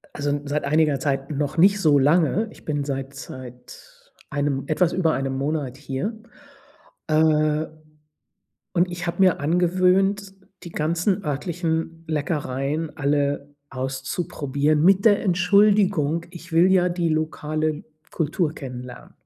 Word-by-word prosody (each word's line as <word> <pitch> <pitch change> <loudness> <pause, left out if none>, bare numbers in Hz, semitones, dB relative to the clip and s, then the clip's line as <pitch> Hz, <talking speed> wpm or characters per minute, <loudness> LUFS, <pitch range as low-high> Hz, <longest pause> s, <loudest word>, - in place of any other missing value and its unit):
also, 145 0 -2
n 145 0 -2
seit 145 +1 -1
einiger 150 -1 +2
Zeit, 135 0 -2
noch 145 +1 -2
nicht 200 +4 +5
so 155 -6 +4
lange. 165 +8 +3
Ich - - -17
bin 145 -2 -1
seit 135 -1 -4
seit 135 - -12 0.2
1 145 -2 -1
etwas 170 +2 +1
über 165 -4 +2
1 135 0 -2
Monat 140 -2 -2
hier. 140 - -4 0.9
Äh 155 0 +2 1.1
und 180 0 +2
ich 175 0 -5
habe 170 - -3
mir 185 -2 +4
angewöhnt, 185 +5 +2 0.3
die 170 - -9
ganzen 175 +6 0
örtlichen 165 +2 -3
Leckereien 150 0 -2
alle 145 0 -1
auszuprobieren 140 +2 -1
mit 195 +3 +4
der 205 -3 +5
Entschuldigung: 185 -3 +3
Ich 175 -1 -12
will 170 +3 +5
ja 180 -1 +4
die 175 -1 -1
lokale 155 0 -2 0.3
Kultur 160 0 -1
kennenlernen. 125 -3 -9
155 Hz, 130 wpm, -23 LUFS, 140-175 Hz, 1.1 s, nicht